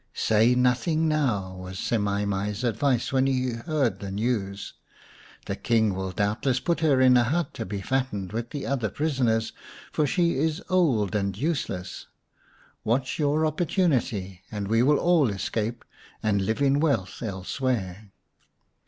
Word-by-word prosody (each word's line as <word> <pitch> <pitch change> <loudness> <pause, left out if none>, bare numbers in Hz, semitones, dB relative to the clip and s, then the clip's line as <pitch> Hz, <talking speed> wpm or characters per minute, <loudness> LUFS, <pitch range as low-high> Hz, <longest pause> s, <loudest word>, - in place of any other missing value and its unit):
" - - -44 0.2
Say 110 +3 +5
nothing 130 +6 +2
now," 115 -12 0
was 95 +1 -8
Semai 100 -1 0
mai's 100 +3 -2
advice 120 +2 0
when 135 0 +3
he 130 -1 0
heard 120 +2 -1
the 100 - -6
news. 100 -1 -2 0.4
" - - -23
The - - -3
King 110 -3 +1
will 95 0 -3
doubtless 105 +7 0
put 170 +2 0
her 150 -5 +3
in 130 -1 +6
a 120 - +4
hut 155 +6 -1
to - - -5
be 100 0 -4
fattened 105 -6 -2
with 115 +1 -3
the 145 - -5
other 125 -6 -1
prisoners, 125 -7 0 0.4
for 150 - +1
she 170 -3 +1
is 160 +2 0
old 140 - +2
and 100 -2 -1
useless. 105 - -3 0.8
Watch 125 +6 0
your 150 +1 +2
opportunity, 135 - 0
and 105 -2 -4
we 115 +1 +3
will 145 +4 +4
all 170 -7 +3
escape 110 +3 -3 0.4
and 100 -2 +2
live 110 +6 0
in 140 +1 +3
wealth 135 - 0
elsewhere." 105 -1 -3
120 Hz, 155 wpm, -26 LUFS, 100-140 Hz, 0.8 s, in